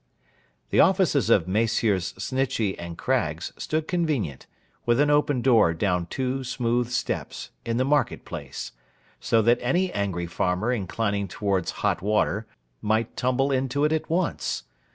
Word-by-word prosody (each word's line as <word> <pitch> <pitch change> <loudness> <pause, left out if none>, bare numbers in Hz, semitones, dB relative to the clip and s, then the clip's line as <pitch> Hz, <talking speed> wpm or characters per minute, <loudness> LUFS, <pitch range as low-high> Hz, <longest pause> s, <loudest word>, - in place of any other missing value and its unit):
The - - +3
offices 180 - +4
of 95 -7 +4
Messrs. 105 -2 +1
Snitchey 130 -7 -1
and 85 -1 -7
Craggs - - -1
stood 155 0 -2
convenient, 150 - -1 0.4
with 120 +1 +2
an 145 0 +4
open 145 -4 +2
door 110 -10 +4
down 90 -1 0
two 130 +5 -2
smooth 120 -1 0
steps, 125 - -3 0.2
in 115 0 0
the 130 - +2
market 145 +1 +1
place; - - -6 0.5
so 115 -1 +2
that 120 +2 +4
any 175 +9 +1
angry 95 -4 -1
farmer 90 +6 0
inclining 100 -2 -1
towards 95 -1 -1 0.2
hot - - +1
water, 105 +1 0 0.3
might 110 +2 0
tumble 130 +2 +1
into 135 +2 +1
it 150 - +2
at 160 - -2
once. 170 +1 -1
120 Hz, 145 wpm, -25 LUFS, 100-135 Hz, 0.5 s, offices